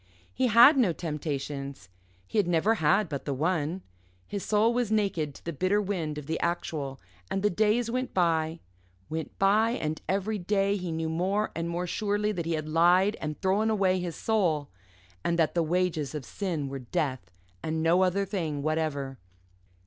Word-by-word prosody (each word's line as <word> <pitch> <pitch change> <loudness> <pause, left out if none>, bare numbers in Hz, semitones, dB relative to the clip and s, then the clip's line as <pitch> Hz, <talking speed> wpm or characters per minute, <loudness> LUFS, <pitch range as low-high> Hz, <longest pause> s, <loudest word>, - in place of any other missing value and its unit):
He 260 0 +1
had 240 +6 +8
no 215 -10 +3
temptations; 140 - -4 0.4
he 95 - -1
had 200 - +2
never 175 +6 +3
had 170 +7 +3
but 140 -3 -5
the 140 - -2
one. 165 +3 -1 0.4
His 200 - -5
soul 220 +2 +3
was 240 -3 0
naked 195 -9 0
to - - -15
the 170 - -3
bitter 185 +7 +1
wind 175 -7 -2
of 150 - -6
the 160 +2 -2
actual; 150 -5 -2 0.3
and 195 - -2
the 210 - +3
days 220 +4 +2
went 255 +1 -2
by, 165 -2 +1 0.5
went 160 0 -4
by, 215 +4 +3
and 155 -8 -3
every 200 +3 0
day 195 +2 +1
he 180 -4 -4
knew 160 0 -2
more 190 +6 0
and 165 0 -2
more 175 +1 -2
surely 205 +3 0
that 170 -5 -3
he 165 - 0
had 155 -1 -2
lied 175 +6 +4
and 155 -1 -4
thrown 200 +4 +2
away 190 -4 +2
his 175 -2 -4
soul, 175 -10 0 0.5
and 170 - 0
that 160 -2 +2
the 170 - +2
wages 165 -4 0
of 145 -4 -5
sin 170 -8 -3
were 135 0 -5
death, 130 - -2 0.3
and 160 0 -2
no 170 +3 +4
other 190 +2 +2
thing 165 -8 -3
whatever. 150 -4 -2
175 Hz, 180 wpm, -28 LUFS, 155-200 Hz, 0.5 s, had